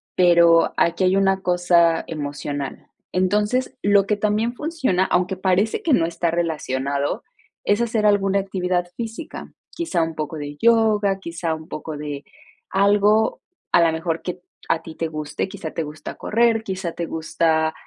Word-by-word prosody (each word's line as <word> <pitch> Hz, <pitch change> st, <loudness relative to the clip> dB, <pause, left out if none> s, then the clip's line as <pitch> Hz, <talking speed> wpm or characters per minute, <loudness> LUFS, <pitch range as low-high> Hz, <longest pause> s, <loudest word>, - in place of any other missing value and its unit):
pero 170 Hz, -2 st, +5 dB
aquí 170 Hz, +3 st, +2 dB
hay 185 Hz, +1 st, +3 dB
una 195 Hz, -1 st, +2 dB
cosa 175 Hz, -2 st, +3 dB
emocional. 145 Hz, -2 st, -5 dB, 0.3 s
Entonces, 210 Hz, +8 st, 0 dB
lo 200 Hz, -1 st, +4 dB
que 210 Hz, -, +1 dB
también 215 Hz, +3 st, 0 dB
funciona, 270 Hz, -, 0 dB
aunque 180 Hz, +1 st, +1 dB
parece 190 Hz, -, +1 dB
que 335 Hz, -, 0 dB
no 165 Hz, -, +4 dB
está 170 Hz, 0 st, -1 dB
relacionado, 140 Hz, -4 st, -2 dB, 0.4 s
es 205 Hz, +3 st, +2 dB
hacer 225 Hz, -2 st, 0 dB
alguna 200 Hz, -1 st, +3 dB
actividad 180 Hz, -2 st, -1 dB
física, 235 Hz, +7 st, -7 dB, 0.2 s
quizá 330 Hz, -, -2 dB
un 165 Hz, 0 st, -2 dB
poco 155 Hz, +1 st, -4 dB
de 145 Hz, 0 st, -6 dB
yoga, 215 Hz, -4 st, +3 dB
quizá 170 Hz, -2 st, -3 dB
un 155 Hz, 0 st, -11 dB
poco 155 Hz, -2 st, -6 dB
de 145 Hz, -1 st, -6 dB, 0.5 s
algo 205 Hz, -, +3 dB, 0.3 s
a -, -, +6 dB
lo 165 Hz, -1 st, +4 dB
mejor 160 Hz, +1 st, -2 dB
que 180 Hz, 0 st, -5 dB, 0.3 s
a 165 Hz, -, +2 dB
ti 160 Hz, -1 st, -10 dB
te 165 Hz, -, -2 dB
guste, 155 Hz, +1 st, -4 dB
quizá 185 Hz, -5 st, -6 dB
te 165 Hz, -, -3 dB
gusta 150 Hz, 0 st, -8 dB
correr, 225 Hz, 0 st, +1 dB
quizá 185 Hz, -4 st, -4 dB
te 170 Hz, -, -3 dB
gusta 160 Hz, 0 st, 0 dB
180 Hz, 160 wpm, -22 LUFS, 160-205 Hz, 0.5 s, a